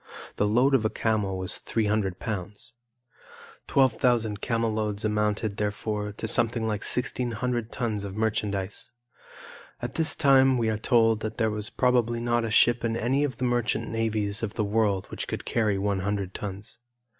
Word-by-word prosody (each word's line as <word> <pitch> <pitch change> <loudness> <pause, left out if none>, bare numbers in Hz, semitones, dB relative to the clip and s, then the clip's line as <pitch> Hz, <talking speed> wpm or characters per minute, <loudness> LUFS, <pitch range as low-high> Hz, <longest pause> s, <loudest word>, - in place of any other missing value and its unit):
The 105 - +2
load 125 +6 +3
of 130 -4 +4
a 110 - +2
camel 105 -5 -1
was 95 0 -3
three 110 -2 -1
hundred 105 -3 0
pounds. 105 0 -6 0.9
12,000 120 -5 +2
camel 115 -1 0
loads 105 -1 -2
amounted, 105 0 0
therefore, 105 0 -2
to 110 - -5
something 115 0 +1
like 105 -2 -2
1,600 120 -1 0
tons 110 -5 -2
of 100 -1 -6
merchandise. 105 -3 -2 0.9
At 120 0 -5
this 160 -1 +1
time 135 -3 +5
we 115 -2 +1
are 110 -1 -1
told 115 -2 +3
that 110 0 -5
there 110 -1 +1
was 105 0 -2
probably 120 -2 +1
not 120 0 0
a 115 - -2
ship 120 +2 +4
in 115 -1 0
any 130 +5 +1
of 130 -5 -2
the 130 - -1
merchant 120 -2 0
navies 110 -2 0
of 110 -2 -4
the 110 - 0
world 100 -2 +1
which - - -4
could - - -5
carry 110 -4 +1
one 100 0 0
hundred 100 -1 -2
tons. 100 +3 -7
110 Hz, 170 wpm, -26 LUFS, 105-120 Hz, 0.9 s, time